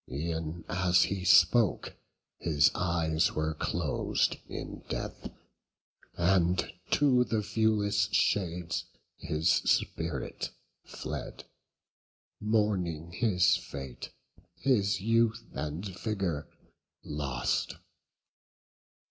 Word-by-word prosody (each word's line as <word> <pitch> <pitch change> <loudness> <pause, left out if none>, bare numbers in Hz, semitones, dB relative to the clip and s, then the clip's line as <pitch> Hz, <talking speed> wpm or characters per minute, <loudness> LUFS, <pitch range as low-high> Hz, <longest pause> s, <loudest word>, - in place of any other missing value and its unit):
E'en 80 +3 -4
as 90 0 +3
he 95 -2 -2
spoke, 95 +4 +4 0.4
his 75 -3 +3
eyes 85 -1 +1
were 80 0 -1
clos'd 75 - 0
in - - -6
death; - - -5 0.9
And 90 0 +2 0.2
to 130 -4 +4
the 110 -3 -1
viewless 105 -2 +1
shades 90 -3 0 0.3
his 80 +2 -2
spirit 80 -7 0 0.3
fled, - - -6 1.0
Mourning 95 -7 0
his 95 -3 +3
fate, 65 -3 -8 0.5
his 105 -7 +1
youth 115 +1 +2
and 75 +6 -4
vigour 95 -5 -3 0.6
lost. 70 -4 -2
90 Hz, 80 wpm, -30 LUFS, 80-105 Hz, 1.0 s, spoke